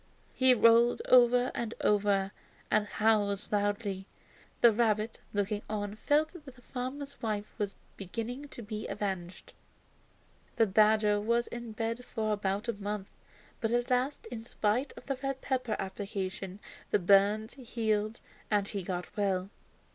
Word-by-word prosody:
He 260 -1 +5
rolled 230 +1 +5
over 245 0 +6
and 235 -1 -3
over 200 -2 +2 0.4
and 210 -1 +3
howled 205 -2 +1
loudly. 205 -1 -1 0.5
The 235 - +8
rabbit, 220 0 +1
looking 205 +1 -1
on, 205 -1 -2
felt 295 +8 +2
that 295 -7 -11
the - - -18
farmer's 270 +3 -5
wife 210 -2 -3
was 205 -1 -2 0.2
beginning 230 +8 -5
to 240 - -9
be 215 0 -5
avenged. 190 -3 -4 1.0
The 225 - +4
badger 210 0 +4
was 235 +2 +2
in 235 -2 -7
bed 230 +2 -2
for 215 -3 -1
about 200 +1 -1
a 235 - 0
month; 205 -1 -4 0.5
but 225 -1 -1
at 240 +1 0
last, 255 +2 0
in 225 -2 -5
spite 230 +3 0
of - - -11
the 275 -2 -3
red 270 -1 -2
pepper 255 -5 -1
application, 195 -1 -4 0.3
his - - +4
burns 200 +4 +4
healed 225 -3 -1 0.3
and 205 -2 +2
he 200 -1 -3
got 180 +1 -5
well. 195 -2 0
215 Hz, 145 wpm, -31 LUFS, 205-240 Hz, 1.0 s, The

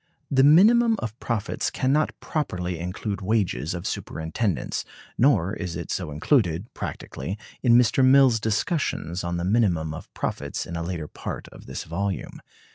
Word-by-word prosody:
The 135 -1 +4
minimum 220 +10 +6
of 110 - -5
profits 115 -3 -2
can 130 - 0
not 155 +1 +1
properly 90 - -3
include 95 +4 -4
wages 95 -5 0
of 85 - -6
superintendence, 80 +5 -2 0.3
nor 105 - +3
is 90 -5 -4
it 85 - -5
so 90 -4 -2
included, 85 - +1
practically, 90 +10 -5 0.2
in 120 -2 +5
Mr. 125 +2 +4
Mill's 130 -3 +6
discussions 105 - -1
on 85 0 -2
the 85 - -2
minimum 90 -7 +2
of 80 - -9
profits - - -3
in 85 - -6
a 85 - -2
later 85 -2 -4
part - - -6
of - - -14
this - - -5
volume. 95 +4 -4
100 Hz, 155 wpm, -25 LUFS, 85-125 Hz, 0.3 s, minimum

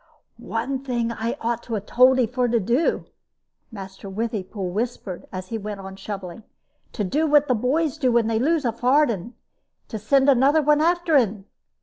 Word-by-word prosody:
"One 245 +3 -3
thing 240 -3 -1
I 230 +3 -3
ought 235 0 -2
to 230 - -5
have 205 -1 -4
told 255 +3 +4
'e 250 - +4
for 245 +2 -1
to 235 0 +1
do," 240 - 0 0.7
Master 195 -2 -9
Withypool 200 -3 -4
whispered, 215 -4 -4
as 185 0 -7
he 225 - -3
went 205 -1 -6
on 190 0 -8
shoveling 195 -1 -7 0.5
"to 215 - -2
do 300 +12 0
what 295 -1 +4
the 255 - +2
boys 280 +6 0
do 260 -4 +2
when 235 -1 +3
they 220 0 0
lose 305 +3 +1
a 235 - +2
farden 245 - +1 0.5
to 220 - -5
send 270 +6 +2
another 280 +3 +4 0.2
after 345 -1 +2
un. 210 -6 0
235 Hz, 180 wpm, -23 LUFS, 210-265 Hz, 0.7 s, told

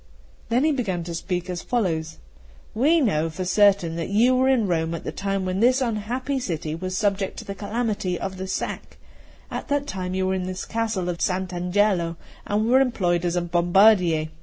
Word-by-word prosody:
Then 240 +4 +2
he 310 - +3
began 200 - -2
to 170 0 -6
speak 175 +1 -3
as 180 -1 -4
follows: 165 -9 -1 0.6
"We 305 +8 +3
know 165 - +1
for 180 +3 -5
certain 195 -3 +3
that 165 - -3
you 235 +6 +4
were 260 +1 +3
in 250 -5 +3
Rome 165 -2 0
at 165 - -7
the - - -4
time 195 -1 -2
when 185 +1 -1
this 250 +4 +4
unhappy 250 +3 -2
city 160 -9 -3
was 185 +3 -4
subject 200 -2 0
to - - -7
the 200 - -5
calamity 205 -3 -2
of 190 -1 -5
the 190 +1 -5
sack; 190 - -4 0.5
at - - -5
that 285 0 0
time 185 -6 -4
you 190 0 0
were 190 - +1
in 185 -1 -2
this 185 0 -5
Castle 220 -5 -2
of 175 -1 -3
Sant' 185 0 -1
Angelo, 180 -1 +1 0.3
and 210 +2 +1
were 255 +3 +5
employed 180 -9 +1
as 175 0 0
bombardier. 175 -1 +3
190 Hz, 195 wpm, -24 LUFS, 175-225 Hz, 0.6 s, were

